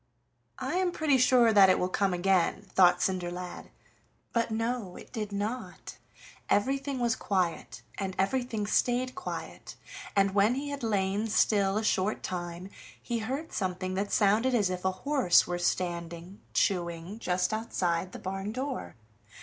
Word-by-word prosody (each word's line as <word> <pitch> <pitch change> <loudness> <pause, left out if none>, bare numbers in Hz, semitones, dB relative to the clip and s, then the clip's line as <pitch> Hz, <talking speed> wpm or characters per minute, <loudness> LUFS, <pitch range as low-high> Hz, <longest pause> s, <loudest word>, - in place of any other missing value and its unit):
"I - - -2
am 370 -1 +1
pretty 300 -6 +2
sure 245 -2 +5
that 195 -2 +7
it 185 - +4
will 180 - 0
come 195 +1 0
again," 180 +1 +1
thought 180 -1 +5
Cinderlad; 180 -1 -3 0.6
but 230 -1 +1
no, 225 -3 -2
it - - -12
did 210 -3 -4
not. 210 +5 -5 0.5
Everything 275 +5 +1
was 240 -2 +1
quiet, 170 - -2 0.2
and 190 -1 -3
everything 225 +1 0
stayed 250 +4 +1
quiet, 365 - -7 0.4
and 195 -1 +3
when 205 +4 +3
he 285 +2 -4
had 285 -1 -5
lain 205 -1 0
still 200 -2 +2
a 220 - -1
short 205 0 0
time 175 +1 -5 0.3
he 235 -1 -3
heard 270 +8 -4
something 185 -1 -2
that 200 +2 -2
sounded 220 +5 +3
as 205 -5 +2
if 180 0 -4
a 190 - +3
horse 265 -1 +3
were 175 0 -3
standing 175 +1 -3
chewing 175 +1 -1
just 180 0 0
outside 185 -5 -1
the - - -8
barn 195 +2 -4
door. 260 +3 -4
200 Hz, 150 wpm, -29 LUFS, 185-235 Hz, 0.6 s, that